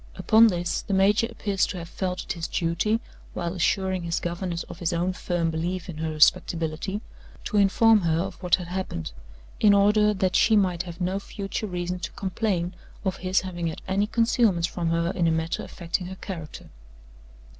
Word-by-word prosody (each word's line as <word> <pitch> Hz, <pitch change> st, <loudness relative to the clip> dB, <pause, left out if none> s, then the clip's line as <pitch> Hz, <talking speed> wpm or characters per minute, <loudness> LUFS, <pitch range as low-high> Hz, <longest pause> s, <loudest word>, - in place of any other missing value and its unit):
Upon 225 Hz, +1 st, +6 dB
this, 175 Hz, -4 st, -1 dB
the 200 Hz, -, -2 dB
major 205 Hz, +4 st, +4 dB
appears 200 Hz, -4 st, 0 dB
to -, -, -5 dB
have 170 Hz, -1 st, -6 dB
felt 180 Hz, +1 st, -3 dB
it -, -, -3 dB
his 165 Hz, -1 st, -4 dB
duty 175 Hz, +7 st, 0 dB, 0.4 s
(while 170 Hz, 0 st, -2 dB
assuring 190 Hz, +1 st, 0 dB
his 170 Hz, 0 st, -1 dB
governess 175 Hz, 0 st, -3 dB
of -, -, -11 dB
his 170 Hz, -1 st, -1 dB
own 175 Hz, +2 st, 0 dB
firm 175 Hz, -2 st, -1 dB
belief 170 Hz, +3 st, -3 dB
in 165 Hz, -, -6 dB
her 160 Hz, 0 st, -1 dB
respectability) 160 Hz, +5 st, +1 dB, 0.4 s
to 215 Hz, -, -1 dB
inform 210 Hz, +2 st, +5 dB
her 165 Hz, -2 st, +1 dB
of 190 Hz, +3 st, -4 dB
what 180 Hz, -2 st, +4 dB
had 175 Hz, -2 st, -8 dB
happened, 180 Hz, -, -4 dB, 0.5 s
in 205 Hz, -1 st, +6 dB
order 210 Hz, +1 st, +4 dB
that 190 Hz, -3 st, 0 dB
she 220 Hz, -, +5 dB
might 185 Hz, -4 st, +2 dB
have 175 Hz, -1 st, -8 dB
no 185 Hz, +2 st, 0 dB
future 200 Hz, +1 st, -5 dB
reason 180 Hz, -1 st, -3 dB
to 170 Hz, -, -5 dB
complain 190 Hz, -2 st, -1 dB, 0.3 s
of 190 Hz, 0 st, -1 dB
his 185 Hz, +1 st, +1 dB
having 175 Hz, -3 st, -4 dB
had 160 Hz, -, -6 dB
any 195 Hz, +2 st, +1 dB
concealments 225 Hz, -6 st, +2 dB
from 170 Hz, -2 st, -2 dB
her 170 Hz, +1 st, +1 dB
in 170 Hz, -2 st, +1 dB
a -, -, +3 dB
matter 160 Hz, +1 st, -1 dB
affecting 175 Hz, +1 st, -4 dB
her 190 Hz, -, -7 dB
character. 170 Hz, -5 st, -8 dB
180 Hz, 190 wpm, -25 LUFS, 170-195 Hz, 0.5 s, Upon